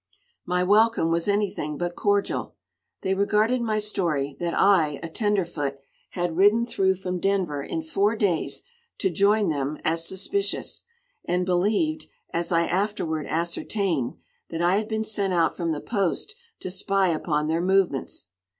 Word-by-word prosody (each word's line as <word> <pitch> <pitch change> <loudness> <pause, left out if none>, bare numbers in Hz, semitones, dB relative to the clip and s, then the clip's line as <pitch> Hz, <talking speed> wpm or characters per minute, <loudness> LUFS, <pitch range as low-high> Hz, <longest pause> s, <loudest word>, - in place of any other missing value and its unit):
My 180 0 +1
welcome 210 -3 +4
was 165 +2 +1
anything 200 -7 0
but 175 0 -3
cordial. 205 -1 0 0.5
They 190 - 0
regarded 210 +5 +2
my 220 -2 0
story 170 -10 -1
that 170 -1 -1
I, 160 -8 +4
a - - -3
tenderfoot, 170 -8 -1 0.4
had 175 -2 -1
ridden 205 +6 +5
through 190 -5 +1
from 180 -1 -4
Denver 185 -7 0
in 160 +3 -4
four 200 +7 +1
days 195 -7 0 0.3
to 190 - 0
join 200 +2 +3
them 145 0 -1
as 165 +1 +1
suspicious, 395 - -2 0.4
and 180 +1 0
believed, 210 - +1 0.3
as 170 +1 -1
I 170 0 +3
afterward 175 -5 -1
ascertained, 170 - -1 0.3
that 165 - -4
I 180 +3 +4
had 215 0 -1
been 220 0 -1
sent 200 -3 -1
out 170 -2 +2
from 170 -2 -1
the 150 - -2
post 200 - -2 0.3
to 185 - -4
spy 195 0 +1
upon 155 -2 0
their 165 +2 +1
movements. 185 - +1
185 Hz, 150 wpm, -25 LUFS, 165-205 Hz, 0.5 s, ridden